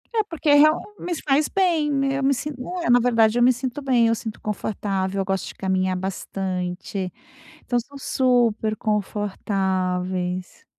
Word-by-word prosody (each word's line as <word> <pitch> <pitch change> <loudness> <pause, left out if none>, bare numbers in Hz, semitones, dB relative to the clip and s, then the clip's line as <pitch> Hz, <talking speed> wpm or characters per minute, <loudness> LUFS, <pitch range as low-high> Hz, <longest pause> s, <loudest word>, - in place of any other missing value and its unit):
É 440 - +3
porque 330 -6 -3
é 290 - +7
real 305 +2 +6 0.2
me 355 - -3
faz 290 +1 +2
bem, 335 -6 +1
né, 275 -1 +1
eu 275 - -2
me 275 +1 +4
sinto, 280 +1 -5 0.2
eh, - - -1
na 245 0 +6
verdade 230 -2 +3
eu 240 - +4
me 255 +1 +6
sinto 255 +2 -4
bem, 250 -4 +3
eu 230 - +2
sinto 220 -1 -7
confortável, 195 -2 -2
eu - - -2
gosto 195 0 -2
de - - -8
caminhar 185 -1 0
bastante, 185 0 -4 0.5
então 245 - 0
são 280 +4 -7
super 240 -5 +1
confortáveis. 185 -3 -2
220 Hz, 165 wpm, -23 LUFS, 190-270 Hz, 0.5 s, é